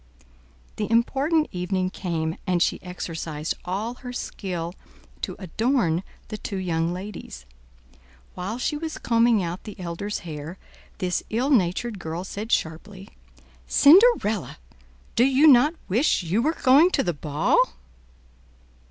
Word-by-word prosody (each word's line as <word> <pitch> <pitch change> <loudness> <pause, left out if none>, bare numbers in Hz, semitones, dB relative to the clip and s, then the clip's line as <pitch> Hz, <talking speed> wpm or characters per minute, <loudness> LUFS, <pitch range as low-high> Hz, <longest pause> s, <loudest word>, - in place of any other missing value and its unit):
The 210 - -2
important 275 +7 +2
evening 185 0 -1
came, 165 -4 -3
and 180 -1 +2
she - - +1
exercised 165 -3 -4
all 200 +6 -2
her 250 -2 -6
skill 180 -8 -5 0.5
to - - -4
adorn 190 -2 0 0.3
the 215 -1 -6
two 195 - -5
young 170 -3 -1
ladies. 180 - -8 0.9
While 190 +6 -4
she 255 - -1
was 320 +1 -5
combing 230 -3 +3
out 175 +2 -5
the 210 -1 -10
elder's 185 +4 -4
hair, 155 +2 -7 0.4
this 180 -2 -1
ill 250 +6 0
natured 205 0 +1
girl 165 +1 -4
said 210 +4 -6
sharply, 185 +5 -2 0.6
"Cinderella, 310 - +5 0.6
do 235 - +5
you 270 +3 +4
not 295 +2 +6
wish 225 - +2
you 180 +7 +1
were 310 +6 +1
going 280 +7 +6
to 270 - +2
the 175 - -1
ball?" 150 0 +1
195 Hz, 130 wpm, -24 LUFS, 175-240 Hz, 0.9 s, not